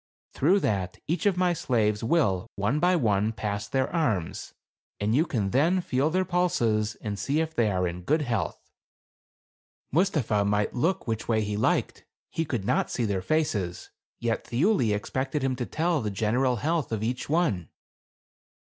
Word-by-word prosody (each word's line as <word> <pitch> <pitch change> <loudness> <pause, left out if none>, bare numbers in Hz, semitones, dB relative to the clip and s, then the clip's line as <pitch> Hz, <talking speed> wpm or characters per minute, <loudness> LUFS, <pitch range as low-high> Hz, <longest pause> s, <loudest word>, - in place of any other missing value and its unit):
through 180 +9 +3
that 95 - -1
each 180 +6 0
of 190 -3 +2
my 180 -1 +3
slaves 110 -9 0
will, 115 - +1
one 105 +9 0
by 180 +3 +3
one, 110 - +2
pass 105 -2 -3
their 130 -1 0
arms, 110 - -1 0.5
and 105 +2 0
you 155 +7 +3
can 105 -9 -1
then 165 +9 +3
feel 140 -3 0
their 185 +3 +1
pulses 115 - +1
and 105 -2 -4
see 140 +9 0
if 160 0 -1
they 115 -6 +2
are 90 -2 0
in 85 +1 -5
good 150 - +1
health." 115 - -3 1.2
Mustapha 145 - +2
might 105 +1 0
look 170 +9 0
which 110 -2 -3
way 110 -2 +2
he 105 0 -2
liked, 105 - 0 0.3
he 165 - -1
could 120 -9 -3
not - - +1
see 120 - -1
their 100 -3 -1
faces, 100 - -1 0.3
yet 115 -1 -2
Thiuli 125 - +2
expected 130 +7 -2
him 130 -1 +1
to 120 -1 -4
tell 165 0 0
the 105 - -2
general 115 +6 +1
health 155 +1 -1
of 110 -1 -2
each 125 +4 -2
one. 145 - +1
120 Hz, 170 wpm, -27 LUFS, 105-160 Hz, 1.2 s, through